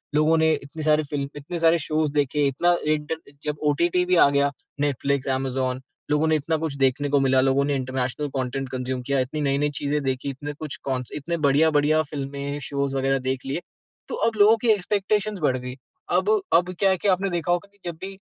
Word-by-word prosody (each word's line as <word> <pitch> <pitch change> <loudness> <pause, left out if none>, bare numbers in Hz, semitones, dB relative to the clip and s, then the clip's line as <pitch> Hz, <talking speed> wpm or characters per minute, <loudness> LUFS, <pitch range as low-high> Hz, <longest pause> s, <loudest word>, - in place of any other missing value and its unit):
लोगों 155 +2 +4
ने 160 0 +3
इतनी 150 +2 -6
सारी 155 0 +3
फ़िल्म, 140 -1 -3
इतने 155 +4 -5
सारे 165 0 +4
शोज़ 155 -1 0
देखे, 145 0 +1
इतना 175 +6 +2 0.2
इंटर्न 150 0 -5
जब 150 0 -2
ओटीटी 175 +4 +2
भी 180 0 +2
आ 165 - +6
गया, 140 0 +2 0.3
नेटफ्लिक्स, 140 -1 0
एमेज़ॉन, 130 -1 -1 0.3
लोगों 150 +2 +2
ने 160 - +3
इतना 155 +2 0
कुछ 155 -2 -3
देखने 135 +1 +1
को 140 0 +3
मिला, 130 -1 +3
लोगों 135 +1 +2
ने 145 0 0
इंटरनेशनल 130 +2 -2
कॉन्टेंट 135 0 -2
कंज़्यूम 130 0 -3
किया, 140 -1 +1
इतनी 135 +4 -2
नई-नई 140 +1 +1
चीज़ें 145 +1 0
देखी, 130 +1 -2
इतने 145 +2 -6
कुछ 155 -3 -5
कॉन्स 130 -2 -3
इतने 170 +4 -3
बढ़िया-बढ़िया 150 +1 +3
फ़िल्में, 140 -1 -5
शोज़ 140 -1 -2
वगैरह 135 0 +1
देख 130 -1 -3
लिए, 135 +6 -2 0.5
तो - - -4
अब 230 - -1
लोगों 215 +2 +6
की 240 - +1
एक्सपेक्टेशन्स 205 +1 -1
बढ़ 135 -4 +2
गयी। 125 0 -6 0.4
अब 185 +3 +2 0.2
अब 175 +2 +4
क्या 195 - +4
है 190 - +2
कि 205 - -2
आपने 195 0 +2
देखा 175 -1 -1
होगा 175 +3 0
कि - - -27
जब 170 - -6
भी 190 +1 -5
145 Hz, 205 wpm, -24 LUFS, 135-160 Hz, 0.5 s, आ